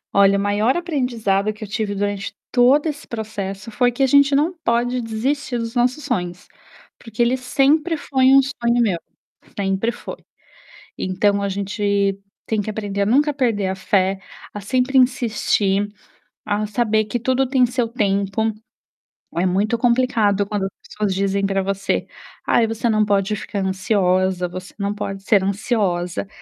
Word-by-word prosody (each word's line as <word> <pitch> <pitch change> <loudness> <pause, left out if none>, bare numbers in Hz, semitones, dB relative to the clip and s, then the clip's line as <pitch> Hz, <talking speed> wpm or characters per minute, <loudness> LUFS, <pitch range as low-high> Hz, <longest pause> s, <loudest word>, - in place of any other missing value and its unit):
Olha, 200 0 +5
maior 205 +7 +1
aprendizado 235 - 0
que 215 +1 -10
eu - - -6
tive 205 0 -2
durante 205 0 -3 0.2
todo 255 +5 +4
esse 300 -2 -4
processo 210 -2 -5
foi 245 +2 +2
que 245 +3 -1
a - - +6
gente 280 +1 +5
não 305 +6 +2
pode 245 +2 +1
desistir 245 +4 -2
dos 230 -1 -4
nossos 255 +4 +1
sonhos, 180 -8 -3 0.5
porque 225 -1 -14
ele 240 +2 +2
sempre 285 +6 +1
foi 265 -3 0
um 270 +1 +7
sonho 240 -3 0
meu, 200 -8 +1 0.6
sempre 195 +3 0
foi. - - -8 0.8
Então 200 +2 +1
a 200 - 0
gente 200 0 -1 0.3
tem 220 -2 0
que 205 - -5
aprender 205 -2 -3
a - - 0
nunca 290 +7 +3
perder 230 -8 0
a 190 - -2
fé, 190 0 +1 0.3
a 205 - -5
sempre 255 +5 +1
insistir, 215 -5 +2 0.6
a 210 0 -1
saber 215 0 +1
que 225 +3 -3
tudo 260 +2 +1
tem 260 -1 +3
seu 245 0 -1
tempo. 205 -1 0 0.8
É 170 - +1
muito 200 +6 +1
complicado 230 -4 +2
quando 205 -1 -2
as - - -5 0.2
pessoas 210 -2 -2
dizem 200 +1 0
para 195 0 0
você, 195 +1 -1 0.4
ai 230 - +3
você 225 +1 -2
não 215 -1 +3
pode 200 0 +1
ficar 200 0 -5
ansiosa, 185 -2 +1
você 185 +1 -8
não 200 0 -1
pode 195 -2 -5
ser 205 -2 +4
ansiosa, 195 -3 -1
215 Hz, 160 wpm, -21 LUFS, 195-245 Hz, 0.8 s, um